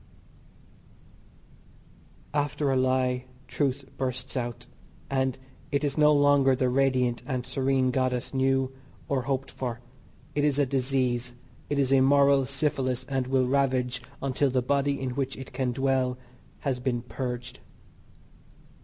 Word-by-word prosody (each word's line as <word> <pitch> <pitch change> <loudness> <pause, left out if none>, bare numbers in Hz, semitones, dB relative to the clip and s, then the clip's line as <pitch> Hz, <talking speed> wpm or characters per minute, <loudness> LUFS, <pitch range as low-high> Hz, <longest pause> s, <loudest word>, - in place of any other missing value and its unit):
After 145 -1 0
a - - +2
lie 130 -1 +1 0.2
truth 135 -2 -1
bursts 130 -1 -3
out, 120 -3 -3 0.5
and 130 -1 +1 0.3
it 140 +1 +1
is 145 -2 0
no 150 -1 +5
longer 145 -2 +5
the 130 -1 +1
radiant 125 -2 +2
and 130 -3 -2
serene 130 0 +1
goddess 130 -1 -1
knew 135 0 +2 0.4
or 135 -2 0
hoped 135 +1 -2
for 120 -3 -4 0.5
it 145 0 0
is 145 -2 +2
a 145 - +4
disease, 125 -2 0 0.4
it 145 - 0
is 135 -1 +2
a 135 - +6
moral 140 0 +5
syphilis 135 -2 -1
and 135 -2 -1
will 130 -1 +2
ravage 130 -2 +1 0.2
until 135 +1 +1
the 130 -1 +1
body 140 +2 +1
in 130 -1 -2
which 135 +1 -2
it 135 - -9
can 130 -2 0
dwell 130 0 +1 0.4
has 135 -3 -1
been 125 -2 -1
purged. 125 +1 -5
130 Hz, 135 wpm, -27 LUFS, 125-140 Hz, 0.5 s, a